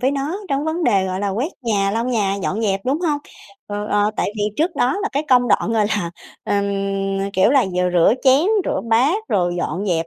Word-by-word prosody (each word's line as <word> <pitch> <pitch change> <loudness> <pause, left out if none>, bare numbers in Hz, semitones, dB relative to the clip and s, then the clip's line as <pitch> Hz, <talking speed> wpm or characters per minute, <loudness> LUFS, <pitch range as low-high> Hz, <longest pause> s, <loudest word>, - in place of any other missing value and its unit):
với 260 - +2
nó 285 +6 -3
trong 275 +1 -1
vấn 320 +2 -1
đề, 195 -7 +2
gọi 185 0 -3
là, 205 - -1
quét 240 - -2
nhà, 200 -4 +1
lau 225 +3 -1
nhà, 215 -6 0
dọn 210 +5 -2
dẹp, 195 -3 0
đúng 275 +5 0
hông? 310 -5 0 0.5
Ờ, 205 0 -4
ờ, 205 0 +1
tại - - -1
vì 210 - -2
trước 330 +1 0
đó 255 +8 +1
là 420 - 0
cái 285 - 0
công 245 -1 +4
đoạn, 215 +2 +2
gọi 215 -2 +2
là, 205 -5 -2 0.3
ờm, 200 0 0 0.6
ờ, 200 - -3
kiểu, 190 +4 +3
là 270 -3 +4
vừa 180 0 +1
rửa 175 +5 +4
chén, 270 +5 +5 0.2
rửa - - -1
bát, 295 - +2
rồi 175 -3 +1
dọn 190 +3 -3
dẹp 165 -3 0
220 Hz, 235 wpm, -20 LUFS, 195-275 Hz, 0.6 s, chén